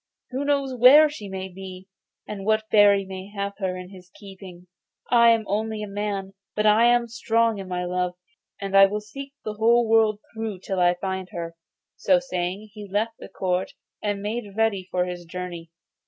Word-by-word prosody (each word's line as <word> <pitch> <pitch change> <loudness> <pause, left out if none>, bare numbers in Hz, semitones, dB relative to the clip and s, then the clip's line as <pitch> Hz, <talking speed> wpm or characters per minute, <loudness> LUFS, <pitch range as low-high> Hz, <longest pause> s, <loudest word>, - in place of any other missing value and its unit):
Who 265 +2 -2
knows 280 -2 0
where 275 +5 +7
she 210 -9 -8
may 190 0 -5
be, 190 0 -10 0.4
and 200 -2 -6
what 215 +1 +1
fairy 205 -2 +5
may 190 +1 -8
have 200 0 -3
her 185 -2 -2
in 180 +1 -9
his 185 -2 -14
keeping? 190 -3 -12 0.5
I 235 -1 +7
am 225 -1 +3
only 215 +1 -2
a - - -5
man, 200 -1 -4 0.2
but 210 - 0
I 215 +2 +5
am 240 0 +4
strong 230 -1 +1
in 190 - -7
my 180 -1 -3
love, 180 0 -1 0.4
and 195 0 -3
I 195 0 +9
will 210 +2 -3
seek 275 +6 -9
the 215 - -3
whole 230 +2 +3
world 220 -1 +4 0.2
through 220 -4 -5
till 190 -1 -3
I 175 0 +4
find 190 0 -4
her.' 170 -1 -5 0.4
So 280 - +4
saying, 195 -3 -4
he 210 -2 -9
left 220 +3 -1
the - - -10
court, 190 +6 -2 0.3
and 205 -1 -2
made 210 -1 -4
ready 205 -4 +1
for 180 -1 0
his 180 -1 -6
journey. 170 -1 -7
200 Hz, 190 wpm, -24 LUFS, 185-225 Hz, 0.5 s, I